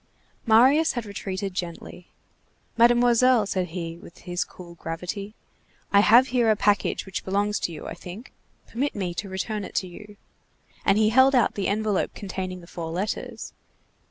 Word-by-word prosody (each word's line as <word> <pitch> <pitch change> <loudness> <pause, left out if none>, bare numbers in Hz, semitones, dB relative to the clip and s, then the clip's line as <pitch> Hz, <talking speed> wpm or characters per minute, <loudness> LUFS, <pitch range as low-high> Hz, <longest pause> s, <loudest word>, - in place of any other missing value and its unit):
Marius 265 +8 +5
had 240 -3 -4
retreated 195 -1 -5
gently. 175 0 -6 0.7
"Mademoiselle," 240 0 +4
said 185 -2 -1
he, 165 -1 -6
with 170 - -14
his 175 -2 -2
cool 175 +1 -13
gravity, 180 +5 -6 0.6
"I 200 - +7
have 240 +5 +6
here 245 -3 +2
a 215 - +4
package 205 -2 +1
which 190 - -5
belongs 205 +2 0
to - - -2
you, 155 - -8
I - - -5
think. 195 +8 -10 0.3
Permit 275 +5 -3
me 185 -4 -3
to 195 +3 -5
return 205 +3 -3
it - - -9
to 185 - 0
you." 210 +3 -12 0.7
And 195 - +4
he 215 0 +4
held 260 +4 +5
out 245 -4 +3
the 200 - -2
envelope 210 -1 -1
containing 185 -2 -5
the - - -13
four 170 -2 -6
letters. 185 +6 -4
200 Hz, 165 wpm, -25 LUFS, 180-225 Hz, 0.7 s, I